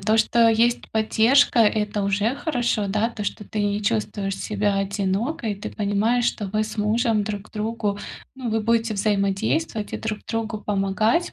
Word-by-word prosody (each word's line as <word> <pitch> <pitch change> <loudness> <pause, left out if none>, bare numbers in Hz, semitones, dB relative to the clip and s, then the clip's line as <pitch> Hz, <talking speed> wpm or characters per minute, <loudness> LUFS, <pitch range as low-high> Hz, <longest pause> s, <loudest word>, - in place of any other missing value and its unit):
то, 215 +3 +2
что 230 +1 +4
есть 230 +2 +2
поддержка- 225 +5 +3
это 210 -1 +2
уже 205 +5 +1
хорошо. 245 -8 -1
Да, 210 +3 +1
то, 210 - -6
что 210 - -4
ты 210 -1 -2
не 205 0 0
чувствуешь 195 - -1
себя 205 -1 -1
одинокой, 200 +5 -1
ты 200 - -7
понимаешь, 215 +4 +1
что 210 -3 -1
вы 215 +2 0
с 215 0 -7
мужем 220 +1 +1
друг 205 0 -5
другу, 215 -1 -2 0.4
ну, 255 -3 -4
вы 220 0 +1
будете 230 0 +1
взаимодействовать 205 +4 0
и - - -1
друг 215 -1 -4
другу 225 -1 -2
помогать, 210 - +1
215 Hz, 165 wpm, -23 LUFS, 205-230 Hz, 0.4 s, что